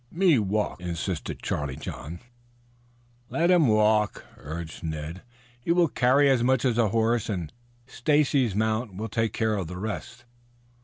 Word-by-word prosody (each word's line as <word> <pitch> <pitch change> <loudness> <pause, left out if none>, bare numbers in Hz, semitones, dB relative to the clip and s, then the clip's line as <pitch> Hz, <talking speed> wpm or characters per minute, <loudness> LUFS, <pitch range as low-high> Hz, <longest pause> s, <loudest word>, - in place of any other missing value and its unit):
"Me 175 -6 +3
walk," 105 -2 -1
insisted 85 -1 -4
Charlie 75 -3 -2
John. 80 +8 -7 1.1
"Let 170 +2 +2
him 170 -6 +5
walk," 105 -1 +2
urged 80 +2 -7
Ned. 80 +2 -5 0.4
"He 120 - -2
will 170 -2 +4
carry 130 +4 +3
as 130 -3 +3
much 130 +1 +2
as 120 -2 +1
a 110 -3 +3
horse, 115 +1 +1
and 90 -7 -3 0.3
Stacy's 135 -4 +1
mount 110 -1 -1
will 110 +3 -4
take 115 +1 0
care 110 -1 0
of 95 -5 -3
the 90 +2 -7
rest." 110 +4 -6
110 Hz, 150 wpm, -26 LUFS, 90-125 Hz, 1.1 s, him